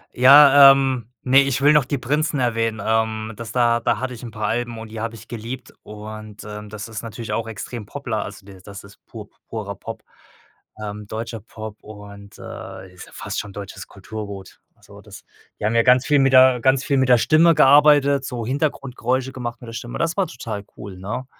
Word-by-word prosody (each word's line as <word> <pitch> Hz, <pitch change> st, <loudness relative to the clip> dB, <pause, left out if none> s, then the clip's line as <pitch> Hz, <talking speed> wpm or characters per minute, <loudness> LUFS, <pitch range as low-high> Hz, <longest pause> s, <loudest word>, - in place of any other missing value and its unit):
Ja, 140 Hz, +1 st, +9 dB
ähm, 130 Hz, -4 st, 0 dB
ne, 135 Hz, +2 st, +5 dB
ich 140 Hz, 0 st, 0 dB
will 145 Hz, +2 st, +5 dB
noch 150 Hz, -4 st, +4 dB
die 140 Hz, +1 st, -2 dB
Prinzen 145 Hz, +4 st, -1 dB
erwähnen. 115 Hz, -2 st, -1 dB
Ähm, 110 Hz, 0 st, -1 dB
das 115 Hz, 0 st, -8 dB
da 120 Hz, -1 st, +2 dB
da -, -, 0 dB
hatte 130 Hz, 0 st, -4 dB
ich 115 Hz, -, -10 dB
'n 120 Hz, -, -6 dB
paar 105 Hz, 0 st, -5 dB
Alben 120 Hz, 0 st, -2 dB
und 110 Hz, -1 st, -9 dB
die 110 Hz, -, -6 dB
habe 115 Hz, 0 st, -4 dB
ich 110 Hz, 0 st, -14 dB
geliebt. 120 Hz, +2 st, -8 dB
Und, 105 Hz, 0 st, -10 dB
ähm, 105 Hz, 0 st, -9 dB
das 105 Hz, 0 st, -7 dB
ist 110 Hz, -1 st, -7 dB
natürlich 115 Hz, 0 st, -7 dB
auch 115 Hz, 0 st, -2 dB
extrem 110 Hz, 0 st, -7 dB
Pop-la 125 Hz, -7 st, -4 dB
also, 100 Hz, -1 st, -9 dB
der 95 Hz, -2 st, -14 dB
das 100 Hz, +1 st, -11 dB
ist 100 Hz, -, -18 dB
pur -, -, -10 dB, 0.2 s
purer -, -, -5 dB
Pop, -, -, -9 dB, 0.8 s
ähm, 105 Hz, 0 st, -7 dB
deutscher 115 Hz, +1 st, -6 dB
Pop 110 Hz, -1 st, -9 dB
und, 100 Hz, -1 st, -12 dB
äh, 95 Hz, -1 st, -10 dB
ist 90 Hz, -, -12 dB
ja -, -, -18 dB
fast -, -, -5 dB
schon 100 Hz, -1 st, -7 dB
deutsches 95 Hz, -1 st, -9 dB
Kulturgut. 100 Hz, -1 st, -9 dB, 0.2 s
So -, -, -15 dB
das -, -, -13 dB, 0.4 s
die -, -, -3 dB
haben 110 Hz, -, +1 dB
ja 115 Hz, -, +5 dB
ganz 125 Hz, +1 st, +4 dB
viel 145 Hz, -1 st, +3 dB
mit 135 Hz, -1 st, +3 dB
der 130 Hz, -1 st, +6 dB
ganz 130 Hz, +1 st, +2 dB
viel 140 Hz, 0 st, 0 dB
mit 130 Hz, -1 st, +2 dB
der 125 Hz, -, +7 dB
Stimme 160 Hz, +6 st, +4 dB
gearbeitet, 145 Hz, -1 st, +5 dB
so 120 Hz, -4 st, -5 dB
Hintergrundgeräusche 130 Hz, -2 st, -2 dB
gemacht 120 Hz, -2 st, -6 dB
mit 120 Hz, -, -11 dB
der 115 Hz, -, -9 dB
Stimme. 120 Hz, +1 st, -6 dB
Das 165 Hz, 0 st, 0 dB
war 195 Hz, -, +1 dB
total 110 Hz, -4 st, -7 dB
cool, 95 Hz, -3 st, -9 dB
ne? 105 Hz, +7 st, -5 dB
115 Hz, 210 wpm, -21 LUFS, 105-130 Hz, 0.8 s, Ja